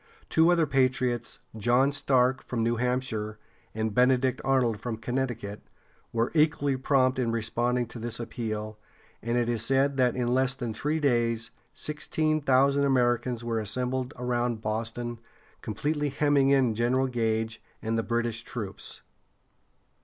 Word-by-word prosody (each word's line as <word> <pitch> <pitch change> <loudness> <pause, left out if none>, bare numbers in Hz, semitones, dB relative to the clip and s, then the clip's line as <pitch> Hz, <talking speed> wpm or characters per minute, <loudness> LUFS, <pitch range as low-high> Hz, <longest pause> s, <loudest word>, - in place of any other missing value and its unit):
Two 160 +2 +4
other 170 -2 +3
patriots, 130 -3 0 0.2
John 120 +5 +3
Stark 130 -2 +2
from 115 -2 -2
New 115 +1 +1
Hampshire, 120 -4 -2 0.4
and 110 -1 -1
Benedict 125 +1 +3
Arnold 125 -5 +2
from 115 0 -4
Connecticut, 120 -3 -3 0.5
were 115 0 0
equally 150 -3 +2
prompt 130 -1 +2
in 120 -2 +1
responding 120 +2 0
to 115 - -9
this 115 0 -4
appeal, 110 -2 -4 0.4
and 115 +1 -1
it 120 -1 +1
is 115 -2 0
said 135 +3 +2
that 125 -2 +3
in 125 -1 0
less 130 +1 +2
than 120 -4 -4
three 150 +8 -1
days, 115 -5 +1 0.2
sixteen 155 0 -1
thousand 140 +1 +3
Americans 120 -3 +1
were 115 -1 -1
assembled 125 +4 -1
around 120 -2 -1
Boston, 115 +2 -3 0.4
completely 145 +7 -1
hemming 140 -1 +2
in 135 -4 +3
General 120 +4 +1
Gage 115 -2 -1 0.2
and 110 0 -2
the 115 - +1
British 120 0 -1
troops. 110 -5 -7
125 Hz, 140 wpm, -27 LUFS, 115-135 Hz, 0.5 s, Two